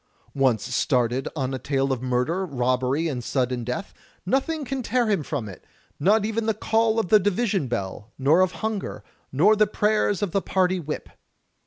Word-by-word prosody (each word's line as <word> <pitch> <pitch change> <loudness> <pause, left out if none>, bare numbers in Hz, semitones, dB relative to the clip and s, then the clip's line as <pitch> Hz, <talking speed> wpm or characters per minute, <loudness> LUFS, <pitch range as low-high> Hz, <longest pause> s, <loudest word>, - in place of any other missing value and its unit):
Once 130 -3 +1
started 125 0 +1
on 135 -3 -2
a 130 - -3
tale 135 0 0
of 125 - -4
murder, 130 +9 0
robbery, 130 0 0
and 130 -6 -3
sudden 125 -2 -1
death, 125 - -4 0.3
nothing 280 - 0
can 265 +1 -3
tear 245 +1 +1
him 200 -6 +1
from 140 -6 -4
it, 95 -4 -11 0.4
not 205 +7 +3
even 225 +1 -1
the 220 - +1
call 225 +1 +1
of 220 -6 0
the 215 - +7
division 200 - 0
bell, 105 -2 -4
nor 145 +7 +4
of 185 -1 +3
hunger, 220 -3 -3 0.3
nor 185 +11 +4
the 215 0 +3
prayers 210 -1 +1
of 195 - -1
the 195 - +1
party 185 -1 +1
Whip. 150 -2 -5
165 Hz, 180 wpm, -24 LUFS, 130-210 Hz, 0.4 s, the